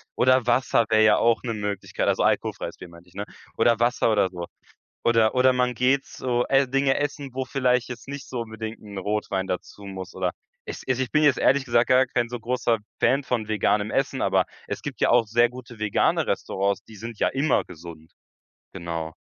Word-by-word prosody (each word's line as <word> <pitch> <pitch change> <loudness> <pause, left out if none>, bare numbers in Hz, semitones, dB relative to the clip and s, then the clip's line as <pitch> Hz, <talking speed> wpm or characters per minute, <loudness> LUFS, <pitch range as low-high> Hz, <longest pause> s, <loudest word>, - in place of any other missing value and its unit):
Oder 130 -1 +3
Wasser 120 -1 +3
wäre 110 0 +4
ja 105 -1 +5
auch 115 -1 +2
'ne 120 -2 -2
Möglichkeit, 105 -2 -3
also, - - +2
alkoholfreies - - -1
Bier, 90 - -11
meinte 85 +1 -16
ich, - - -24
ne? 100 +1 -4 0.3
Oder 115 0 +3
Wasser 120 -1 +2
oder 100 -3 +2
so. 85 -2 -7 0.6
Oder 115 0 +3
oder 130 +1 +5
man 125 -1 +1
geht 130 +3 +2
so, 125 -1 -2
äh, 135 -1 +3
Dinge 135 0 +2
essen, 145 -2 -3
wo 130 +1 -2
vielleicht 125 -2 +1
jetzt 125 0 -8
nicht 140 -1 -7
so 125 - -4
unbedingt 110 0 -6
'n 100 -2 -10
Rotwein 100 -1 -2
dazu 95 +2 -5
muss 95 -1 -8
oder 90 -1 -1 0.3
es - - -7
also, 130 0 +1
ich 125 - -8
bin 155 0 +3
jetzt 145 -3 +4
ehrlich 140 0 +3
gesagt 120 -1 +2
gar 130 +1 +5
kein 120 -1 -1
so 120 0 -5
großer 120 0 0 0.2
Fan 135 +2 +3
von 120 -5 -1
veganem 105 0 +1
Essen, - - -1
aber - - +2 0.2
es - - -4
gibt - - -7
ja - - +4
auch 115 -2 +4
sehr 120 +2 +3
gute 125 -2 -11
vegane 105 -1 +1
Restaurants, 100 +1 -1
die 110 - -14
sind 115 0 -8
ja - - +3
immer 140 +4 +1
gesund. 80 -1 -12 0.6
Genau. 85 -3 -5
115 Hz, 205 wpm, -24 LUFS, 105-130 Hz, 0.6 s, ja